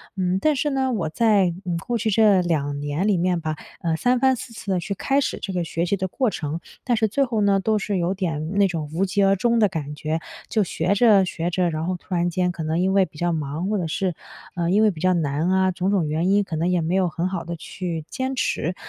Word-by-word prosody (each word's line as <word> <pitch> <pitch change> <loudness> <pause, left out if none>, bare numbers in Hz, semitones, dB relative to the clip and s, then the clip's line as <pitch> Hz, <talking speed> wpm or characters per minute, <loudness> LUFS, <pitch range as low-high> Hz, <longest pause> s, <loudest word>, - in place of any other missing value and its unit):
嗯， 185 0 0
但 305 +4 +2
是 295 +3 0
呢， 265 -1 0
我 165 -8 -1
在， 210 0 +3 0.2
嗯， 170 -2 -1
过 240 +5 -2
去 220 0 0
这 205 -3 +5
2 145 -4 -1
年 145 +7 -1
里 200 -4 +3
面 175 -1 +1
吧， 155 -1 -2 0.3
呃， 165 -2 0
3 245 +7 +2
番 265 0 +4
4 230 0 -9
次 200 -2 -5
地 180 - +1
去 200 +4 -3
开 275 +8 +1
始 - - -2
这 195 - -4
个 180 -2 -1
学 165 +1 -2
习 200 +3 0
的 190 - -2
过 250 +5 0
程， 160 -2 -4 0.2
但 245 -2 +1
是 220 -1 +2
最 275 +6 +1
后 225 -4 -1
呢 200 -1 +3
都 215 +2 +1
是 200 -1 -2
有 175 +2 0
点 165 -4 -3
那 200 -1 +5
种 160 -4 -4
无 190 +4 +1
疾 200 +1 +1
而 195 0 +4
终 235 +4 +1
的 210 - +5
感 150 -2 -5
觉。 155 +2 -2 0.3
就 215 -2 +2
学 180 +2 0
着 205 -3 +5
学 175 -1 -3
着， 180 0 +1
然 155 0 -3
后 185 0 -1
突 180 +1 -9
然 175 0 +1
间 180 0 0
可 170 - -7
能 160 +2 -1
因 190 +1 +2
为 195 -1 +4
比 160 - -16
较 175 +1 0
忙， 155 +4 -3
或 210 - +1
者 170 -3 -2
是， 185 +2 -1 0.4
呃， 170 -1 -1
因 210 +4 +4
为 215 - +5
比 160 - -10
较 185 +1 +3
难 155 +1 0
啊， 190 0 +3
种 185 +1 -1
种 190 -6 +1
原 160 +5 0
因 205 +1 +4
可 165 - -5
能 165 +3 0
也 180 -2 +2
没 170 +4 0
有 185 -2 +3
很 170 +2 -2
好 185 -3 -3
地 170 0 -4
去 165 -1 -5
坚 260 +1 -3
持。 180 -5 -1
185 Hz, 280 characters per minute, -23 LUFS, 165-205 Hz, 0.4 s, 这